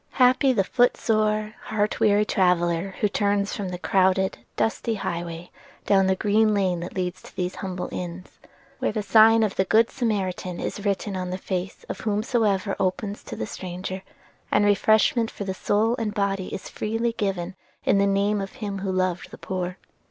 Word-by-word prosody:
Happy 255 +1 +4
the 215 -6 +2
foot 245 +5 +2
sore, 215 -1 +1
heart 215 0 -1
weary 210 0 +4
traveller 180 -1 +1
who 210 - +4
turns 200 0 0
from 195 -3 -4
the 180 - -4
crowded, 190 +1 +2 0.2
dusty 225 +1 0
highway 170 -3 -5 0.3
down 195 -1 +4
the 190 - +3
green 215 +2 +3
lane 185 -3 +1
that 175 - -7
leads 180 -1 -3
to - - -15
these 180 0 -2
humble 185 -2 -4
inns, 180 0 -6 0.5
where - - 0
the 215 -1 -2
sign 225 +1 +6
of 210 -3 0
the 190 - +4
Good 225 +3 +4
Samaritan 190 -7 -2
is 205 - -4
written 200 0 -1
on 185 -1 -3
the 185 - -3
face 185 0 -4
of - - -5
whomsoever 210 -2 0
opens 200 +2 -2
to - - -6
the 110 - -3
stranger, 185 - -6 0.5
and 205 0 +4
refreshment 215 +3 +3
for 200 - -6
soul 215 +5 +1
and 215 -2 -2
body 195 -2 0
is - - -6
freely 225 +2 -1
given 190 -4 -2 0.3
in 195 - +3
the 200 - +3
name 200 +1 +1
of 195 - -6
Him 200 -3 -5
who 190 0 -2
loved 185 -1 -1
the - - -11
poor. 185 -1 -4
200 Hz, 180 wpm, -25 LUFS, 185-215 Hz, 0.5 s, sign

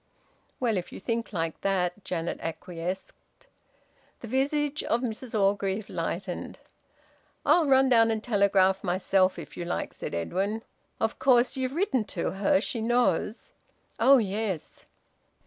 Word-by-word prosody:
"Well, 230 -5 +1
if 180 - -4
you - - -8
think 230 +3 -2
like 165 -4 -3
that," 190 0 0
Janet 170 -1 -3
acquiesced. 175 +2 -5 1.1
The 235 - -7
visage 290 +4 0
of 235 - +1
Mrs 230 -2 -3
Orgreave 195 +1 0
lightened. 175 +2 -4 0.9
"I'll 335 -4 +4
run 265 -1 +5
down 230 -2 +5
and 220 -1 -1
telegraph 195 -3 +3
myself, 185 0 +2
if - - -9
you 175 - -4
like," 175 - -3
said - - -5
Edwin. 195 - -2 0.4
"Of 225 0 -1
course 250 -1 +4
you've 260 +1 -2
written 335 - +1
to 170 - 0
her. 285 +10 +2
She 235 -6 -3
knows 230 -3 0 0.2
" - - -39
"Oh 275 +1 +7
yes!" 205 -5 -3
210 Hz, 140 wpm, -27 LUFS, 185-245 Hz, 1.1 s, Oh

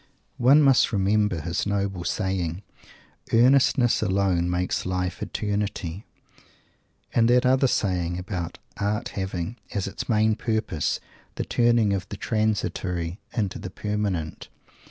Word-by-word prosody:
One 140 +5 +6
must 135 -3 +5
remember 100 -3 +1
his 85 +5 -2
noble 100 -3 -1
saying, 95 -2 -2 0.7
"Earnestness 125 0 +4
alone 95 -4 +1
makes 90 +1 -1
life 90 -2 -2
Eternity" 100 -3 -3 1.1
and 115 0 +4
that 125 +1 +4
other 130 +1 +4
"saying" 90 -6 0
about 90 -2 -4 0.2
Art 105 +1 -1
having, 95 +2 -4 0.2
as 100 - 0
its 100 - -6
main 110 -1 +3
purpose, 110 -9 -1 0.4
the - - -3
turning 120 -3 +3
of 100 +1 -3
the 100 - -6
"Transitory" 100 -5 -1
into 105 -6 -2
the 95 - -6
"Permanent"! 100 -5 -3
100 Hz, 120 wpm, -25 LUFS, 90-110 Hz, 1.1 s, One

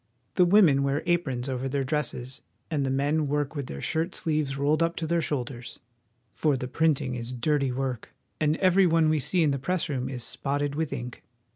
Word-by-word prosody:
The 180 - +4
women 175 -7 +5
wear 140 +2 0
aprons 145 -8 0
over 130 0 -2
their 140 0 0
dresses, 130 -2 -2 0.3
and 145 -3 0
the 135 - 0
men 145 +3 +1
work 145 +1 -1
with 140 -3 -4
their 70 - -6
shirt 165 +3 -1
sleeves 150 -4 -1
rolled 150 +3 +2
up 165 0 +1
to 165 - -3
their 170 +1 +1
shoulders; 125 -5 -4 0.6
for 150 -4 +1
the 125 - -4
printing 145 -2 +1
is 120 0 -5
dirty 135 +2 0
work, 130 -2 -3 0.3
and 155 0 +2
every 185 0 +4
one 165 -1 +3
we 155 -1 +2
see 170 +5 +1
in 150 - +3
the 140 - -1
press 180 +4 -1
room 130 -2 -2
is 125 -3 -5
spotted 145 +2 -2
with 155 0 -2
ink. 120 0 -6
145 Hz, 200 wpm, -27 LUFS, 130-160 Hz, 0.6 s, women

